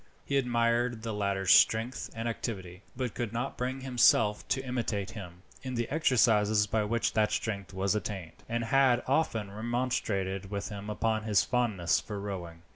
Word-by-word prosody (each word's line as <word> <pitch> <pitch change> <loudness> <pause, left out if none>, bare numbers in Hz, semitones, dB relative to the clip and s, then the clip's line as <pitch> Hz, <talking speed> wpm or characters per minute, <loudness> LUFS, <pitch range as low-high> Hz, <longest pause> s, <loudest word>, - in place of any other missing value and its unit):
He 140 - -2
admired 120 -1 +1
the 115 -1 -3
latter's 100 -2 0
strength 115 +3 +4
and 115 +1 -3
activity, 95 -6 -5 0.2
but 125 -4 -2
could 120 -4 -3
not 120 +4 -3
bring 130 +2 -3
himself 115 -4 +3
to 135 0 -1
imitate 115 -6 -2
him, 90 -4 -10 0.2
in 130 -1 -5
the 120 -1 -1
exercises 110 -8 +3
by 105 +1 0
which 115 +2 0
that 110 -1 +2
strength 100 -5 -3
was 95 +1 0
attained, 95 -6 -5
and 115 0 -1
had 125 +1 +3
often 115 -8 0
remonstrated 105 -4 -2
with 100 0 -4
him 105 0 -7
upon 110 0 -1
his 105 -4 +3
fondness 115 -9 +1
for 105 -2 -6
rowing. 90 -5 -6
110 Hz, 165 wpm, -30 LUFS, 100-120 Hz, 0.2 s, strength